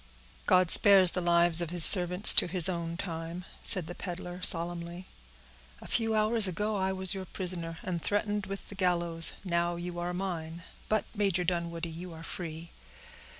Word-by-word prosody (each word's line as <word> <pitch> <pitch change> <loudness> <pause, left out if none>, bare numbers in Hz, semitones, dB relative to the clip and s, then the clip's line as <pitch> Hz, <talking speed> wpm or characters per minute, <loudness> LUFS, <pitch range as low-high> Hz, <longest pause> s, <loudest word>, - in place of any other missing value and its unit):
"God 185 -2 +2
spares 195 -3 +7
the 180 - -5
lives 170 -1 +2
of 170 - -5
His 175 -2 +4
servants 180 +1 +7
to - - +4
His 180 -1 0
own 170 -2 -6
time," 170 -1 -7 0.2
said 185 -6 +3
the 175 - -10
peddler, 180 0 -9
solemnly. 170 +1 0 0.7
"A - - -15
few 225 -2 -2
hours 215 0 +1
ago 210 +4 -4
I 190 -1 -3
was 190 0 +3
your 190 -1 -8
prisoner, 175 -3 -4
and 175 -2 -6
threatened 205 +1 -4
with 195 0 -10
the - - -11
gallows; 170 -3 +1
now 170 -1 -3
you 175 0 -8
are 175 +1 -5
mine; 170 -3 -7 0.3
but, 215 -1 -2
Major 195 -4 -2
Dunwoodie, 170 -1 -5
you 175 +1 -11
are 160 0 -13
free. 165 -1 -9
175 Hz, 170 wpm, -27 LUFS, 170-190 Hz, 0.7 s, spares